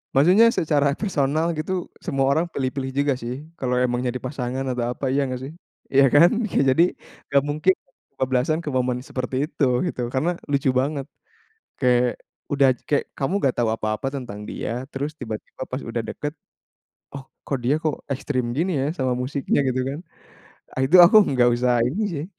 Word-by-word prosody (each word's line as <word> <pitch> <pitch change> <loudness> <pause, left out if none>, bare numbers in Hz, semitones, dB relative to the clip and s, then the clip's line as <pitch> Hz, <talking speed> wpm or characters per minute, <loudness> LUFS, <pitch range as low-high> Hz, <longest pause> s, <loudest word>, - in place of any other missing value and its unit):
maksudnya 185 +11 +6
secara 145 -3 +2
personal 160 -4 0
gitu 160 +5 -2 0.3
semua 135 -6 +1
orang 160 +4 +2
pilih-pilih 130 0 -2
juga 140 -1 +2
sih. 120 +1 -4 0.3
Kalau 125 -1 0
emang 125 -1 +1
jadi 125 +1 -2
pasangan 130 -1 -3
atau 120 -1 -1
apa 140 - -4
iya 140 - +2
nggak 130 0 -4
sih? 145 +4 -7 0.4
Ya 140 - +8
kan? 170 +4 +8 0.4
Jadi 160 +6 +5 0.5
nggak 140 0 +3
mungkin 155 +6 +3 0.4
kebablasan 130 +5 0
ke - - -2
momen 125 -1 0
seperti 130 0 -4
itu, 150 -4 0 0.2
gitu. 125 - -4
Karena 155 +7 +1 0.2
lucu 140 -1 +2
banget 140 -1 -2 0.8
kayak 125 -1 +2 0.3
udah 140 -1 +4 0.2
kayak 145 - +2
kamu 140 +8 -1
gak 130 - +2
tahu 115 - +2
apa-apa 110 +5 -2
tentang 105 -5 -7
dia, 125 +4 -4
terus 145 +3 -4
tiba-tiba 110 +2 -7
pas 130 +2 -4
udah 115 0 -3
deket, 145 0 -4 0.8
"Oh 140 -1 -8 0.2
kok 140 - -1
dia 135 +5 +3
kok 155 -3 0 0.2
ekstrim 130 -1 -2
gini 180 +4 0
ya 135 - 0
sama 130 -3 0
musiknya" 140 +2 -1
gitu 130 0 0
kan, 140 +3 -4 0.9
itu 165 +7 +3
aku 200 - +6
enggak 125 -2 +3
usah 120 -1 +2
ini 180 +12 -2
sih. 150 +1 -3
135 Hz, 170 wpm, -23 LUFS, 125-145 Hz, 0.9 s, Ya